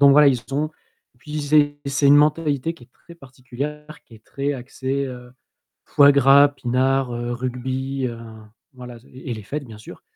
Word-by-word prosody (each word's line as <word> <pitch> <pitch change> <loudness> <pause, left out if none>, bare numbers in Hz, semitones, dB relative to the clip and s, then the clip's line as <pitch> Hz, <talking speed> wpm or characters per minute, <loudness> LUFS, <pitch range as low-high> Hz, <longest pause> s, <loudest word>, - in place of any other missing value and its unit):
Donc 140 -1 +7
voilà, 145 0 +6
ils 125 -3 0
ont 155 +3 -1 0.5
puis 150 +4 -6
c'est 145 0 +2
c'est 140 +1 +1
une 145 +1 +7
mentalité 150 0 +1
qui 120 - -17
est 125 - -30
très 170 - -17
particulière. 140 +2 -8
Qui 115 - -18
est 110 - -19
très 140 +1 -3
axée, 135 +1 -4
heu, 125 -1 -10 0.5
foie 145 0 +5
gras, 140 +1 +6
pinard, 130 -1 -1
heu, 120 0 -4
rugby 130 +2 -3
heu, 115 -1 -8 0.5
voilà 125 -2 -11
ze 115 - -23
et 130 0 -8
les 110 - -9
fêtes 140 +8 -6
bien 110 -4 -12
sûr. 110 - -13
135 Hz, 185 wpm, -21 LUFS, 125-145 Hz, 0.5 s, Donc